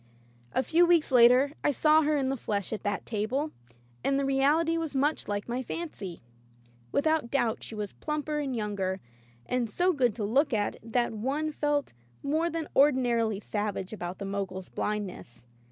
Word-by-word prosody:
A 260 - +2
few 340 +4 +4
weeks 335 -4 +3
later 250 +3 +6
I - - +3
saw 305 +3 +4
her 300 0 +2
in 265 -2 0
the 270 - 0
flesh 205 -4 -3
at 215 - -4
that 205 -2 -2
table, 240 +8 -1 0.5
and 275 - +2
the 275 - +1
reality 290 +5 +3
was 325 -3 -3
much 290 +3 +1
like 205 0 -2
my 245 +2 -2
fancy. 225 - -6 0.7
Without 315 -4 +1
doubt 240 -5 0
she 225 - -7
was 210 -2 -4
plumper 300 0 -3
and 275 -3 -2
younger, 200 -4 -2 0.5
and 250 -2 -1
so 360 - +2
good 250 -8 +2
to 225 - -3
look 260 +7 +2
at 205 -1 -1
that 235 +1 0
one 275 +8 -1
felt 295 - -1 0.3
more 315 +4 +1
than 330 -1 -3
ordinarily 240 -7 +3
savage 205 -2 -3
about 175 -3 -5
the 200 - -5
Mogul's 195 -2 -4
blindness. 185 - -4
255 Hz, 170 wpm, -29 LUFS, 210-295 Hz, 0.7 s, later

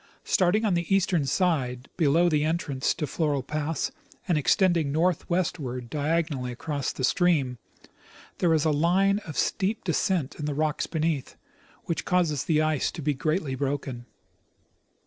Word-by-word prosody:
Starting 195 +5 +2
on 205 - +2
the 170 +2 -1
eastern 180 -6 +1
side, 135 -7 0
below 165 +1 +3
the 150 -3 +2
entrance 155 -4 0
to 155 - -2
Floral 145 -1 -1
pass, 150 +1 -2 0.4
and 175 - +2
ex 150 - +3
tending 175 -6 +2
northwestward 160 -6 -1
diagonally 150 -4 -1
across 140 +2 -3
the 130 - -6
stream, 140 -5 +2 0.8
there 175 - +3
is 160 -1 +2
a 155 - +3
line 185 +7 +3
of 155 - -6
steep 205 +2 0
descent 170 -4 0
in 150 - -3
the 145 -1 -2
rocks 155 0 0
beneath, 160 -4 -2 0.5
which 165 -3 -2
causes 165 -6 +1
the 155 -2 +2
ice 155 -3 0
to 160 - -7
be 150 +1 +1
greatly 155 +1 -1
broken. 135 -2 -3
155 Hz, 150 wpm, -26 LUFS, 140-175 Hz, 0.8 s, below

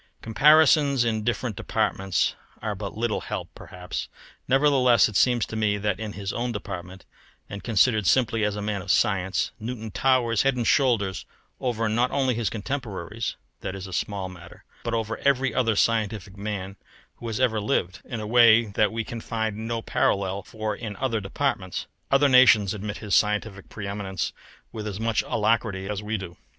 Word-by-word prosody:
Comparisons 145 +2 +5
in 110 -2 -1
different 120 -1 -1
departments 95 0 0 0.3
are 105 -1 -3
but 100 +1 -6
little 115 -1 -1
help - - -5
perhaps, 90 0 -7 0.4
nevertheless 130 -4 +4
it 110 - -8
seems 120 +2 +3
to - - -8
me 105 -2 +1
that 100 -1 -1
in 110 -2 -5
his 100 0 -4
own 120 +1 -2
department, 95 -3 -7 0.4
and 100 -2 -8
considered 110 -2 +3
simply 115 +1 +2
as 105 -1 0
a 105 - -4
man 105 -2 -2
of 100 - -10
science, 95 -3 +1
Newton 110 -1 -5
towers 120 -1 +2
head 135 -1 +2
and 120 -2 -2
shoulders 115 -10 +1 0.3
over, 115 -3 -1
not 120 +4 +1
only 130 -2 +1
his 115 -3 -1
contemporaries 110 -3 -4 0.2
that 95 - -5
is 95 -1 -7
a 95 - -9
small 100 +1 -2
matter 85 -2 -13 0.2
but 115 -1 -2
over 115 0 -2
every 135 -1 +2
other 115 -4 +1
scientific 110 -3 0
man 100 -1 -5 0.4
who 120 - -7
has 110 -2 -3
ever 115 -4 +2
lived, 90 -3 -1
in 115 - -6
a 105 - -5
way 115 0 +6
that 105 +1 +1
we 115 0 -2
can 115 +1 -7
find 110 -2 -2
no 115 +1 -4
parallel 100 0 0
for 110 +1 -4
in 110 -3 -6
other 115 -2 -1
departments. 100 -3 -2 0.2
Other 140 +1 +4
nations 125 -7 +6
admit 105 0 -5
his 105 -3 -5
scientific 105 -1 +1
pre 105 - -7
eminence 100 -3 -3 0.4
with 110 -1 -6
as 100 -1 -5
much 115 0 +1
alacrity 105 -3 0
as 105 0 -3
we 105 +1 -2
do. 90 -3 -8
110 Hz, 180 wpm, -25 LUFS, 100-120 Hz, 0.4 s, way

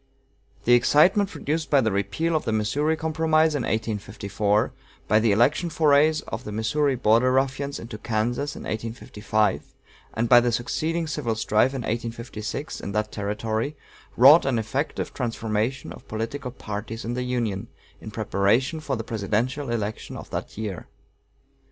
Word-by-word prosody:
The 120 - +5
excitement 175 - +5
produced 155 -3 -3
by 145 - +5
the 110 -4 +1
repeal 100 - -1
of 155 - +1
the - - -2
Missouri 140 +9 +1
Compromise 160 0 +2
in 145 - -1
1854, 105 -2 -1 0.3
by 110 - +4
the 110 -1 +3
election 140 - +3
forays 155 -1 +4
of 110 +3 -6
the 105 - -6
Missouri 130 +6 +1
Border 120 +1 +3
Ruffians 135 +2 0
into 115 -2 -8
Kansas 120 +6 -1
in - - -8
1855, 110 -2 -2 0.4
and 115 +1 0
by 120 +1 +8
the 120 0 +1
succeeding 160 +8 -1
civil 140 -7 -2
strife 110 +4 +2
in 130 - -3
1856 115 +2 -4
in 100 - -5
that 105 0 -1
Territory, 110 +6 -2 0.4
wrought 140 +7 +8
an 130 -3 +1
effective 135 +6 -2
transformation 115 0 -2
of - - -14
political 115 +5 -4
parties 110 -1 -6
in 120 - -2
the 125 - -2
Union, 120 -6 -2 0.3
in - - -8
preparation 110 +7 +1
for 145 -3 -2
the 115 - -4
presidential 115 +6 -2
election 110 -2 -3
of - - -10
that - - -5
year. 105 -5 -5
120 Hz, 150 wpm, -25 LUFS, 110-145 Hz, 0.4 s, by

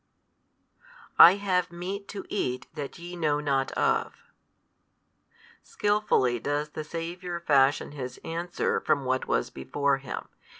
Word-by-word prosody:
I 175 - +11
have 185 -4 0
meat 190 +4 -5
to 200 - -7
eat 125 -10 -2
that 145 -3 -6
YE 175 +1 -8
know 150 -4 +1
not 140 -2 0
of. - - +1 1.5
Skilfully 205 - +1
does 145 +4 -2
the 155 - -6
Saviour 170 +3 -5
fashion 140 -4 +3
His 130 -4 -7
answer 170 +2 -1
from 140 -3 0
what 130 0 0
was - - 0
before 140 - 0
Him. 135 -2 -6
155 Hz, 125 wpm, -27 LUFS, 135-175 Hz, 1.5 s, I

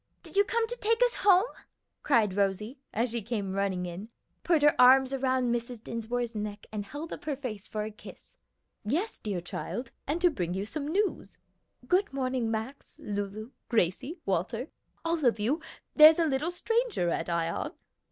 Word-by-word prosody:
Did - - -10
you 405 - +6
come 460 +3 0
to 485 - -4
take 450 +2 +2
us - - +3
home?" 385 0 +5 0.6
cried 225 -8 +3
Rosie, 205 +6 -1
as 230 +2 0
she 235 0 -2
came 205 -3 -3
running 195 -2 -1
in, 180 +5 -7 0.3
put 330 -4 +3
her 295 - +7
arms 260 +1 +7
about 260 -1 +1
Mrs. 240 -1 -2
Dinsmore's 230 +1 -3
neck, 210 -1 -5
and 210 -1 -3
held 300 +8 -6
up - - -9
her 300 -2 -1
face 230 -7 -6
for 215 -1 -3
a 215 - -5
kiss. 210 - -14 0.5
"Yes, 320 - -1
dear 200 -5 -3
child, 235 +7 -5 0.2
and 300 +5 0
to 350 0 +4
bring 180 - -2
you 195 +1 -2
some 285 +6 -4
news. 390 +6 -1 0.5
Good 365 -4 +2
morning, 255 -3 -1
Max, 225 +5 -5
Lulu, 205 +3 -5 0.2
Gracie, 230 - +1
Walter 195 - -1 0.4
all 330 -2 0
of 240 -4 +3
you 265 +10 0 0.3
there's 310 0 +9
a 335 - +3
little 295 +2 0
stranger 455 - 0
at 165 0 -2
Ion." 170 -1 -1
245 Hz, 175 wpm, -29 LUFS, 210-310 Hz, 0.6 s, there's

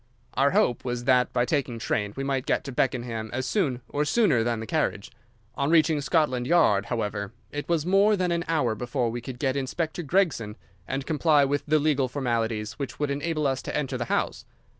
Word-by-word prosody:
Our 140 +2 +3
hope 120 -3 +2
was 120 -1 -3
that, 125 0 +3
by 120 -1 +1
taking 130 -3 -1
train, 105 -2 -2
we 135 - -2
might 135 -2 -1
get - - +1
to 140 - -6
Beckenham 120 -3 -1
as 130 +1 -2
soon 130 - 0
or 145 - -1
sooner 150 - +3
than 115 -1 -1
the 110 - -5
carriage. 110 -8 -1 0.4
On 140 0 -1
reaching 160 -2 +4
Scotland 135 -5 +1
Yard, 130 - +3
however, 105 -2 -3 0.2
it 145 +2 -5
was 165 -2 +1
more 200 +3 +4
than 180 -2 0
an 170 0 0
hour 150 -9 +1
before 120 +1 -2
we 120 +1 -4
could 125 +1 -7
get 135 0 0
Inspector 155 +5 -2
Gregson 150 - 0 0.3
and 135 0 -3
comply 155 -2 +3
with 145 +1 0
the 155 +1 +4
legal 145 -3 +2
formalities 115 -4 -2
which 140 - -5
would 145 -1 -1
enable 150 +2 -1
us 135 -1 0
to - - -3
enter 135 -3 -2
the 120 - -1
house. - - -1
135 Hz, 205 wpm, -26 LUFS, 120-155 Hz, 0.4 s, reaching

